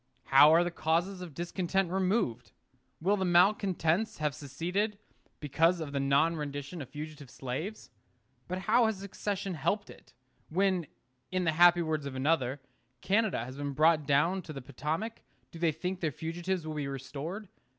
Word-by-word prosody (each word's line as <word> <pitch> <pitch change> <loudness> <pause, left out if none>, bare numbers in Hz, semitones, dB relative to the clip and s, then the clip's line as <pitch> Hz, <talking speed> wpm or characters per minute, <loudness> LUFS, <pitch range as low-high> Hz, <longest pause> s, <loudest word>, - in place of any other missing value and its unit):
How 145 +3 +9
are 165 +2 +6
the 175 - -2
causes 170 +4 0
of 170 -6 -8
discontent 175 +1 -1
removed? 185 - 0 0.5
Will 195 +5 +2
the 190 - -1
malcontents 185 +1 +2
have 150 -2 -1
seceded 175 - -2 0.4
because 165 +4 +2
of 155 -3 -5
the 140 - -1
non 140 +5 +3
rendition 145 +2 -5
of 130 - -8
fugitive 150 -2 -8
slaves? 140 - -5 0.6
But 185 - -3
how 225 +5 +4
has 220 -2 -1
secession 200 0 -4
helped 170 +7 -1
it? - - -18 0.3
When, 185 -1 +1 0.4
in 185 0 0
the 165 - +2
happy 175 +2 +6
words 155 -3 -2
of 135 - -6
another, 135 -1 +1 0.4
Canada 200 - +1
has 130 +2 -9
been 145 -1 -3
brought 155 0 +3
down 165 +7 +3
to 160 -3 -9
the 135 - -6
Potomac, 160 - -4 0.3
do 165 - -10
they 165 -1 +3
think 180 +4 -4
their 160 -4 -1
fugitives 170 +4 -3
will 155 - -4
be 150 -2 -3
restored? 145 - -6
165 Hz, 165 wpm, -30 LUFS, 145-185 Hz, 0.6 s, How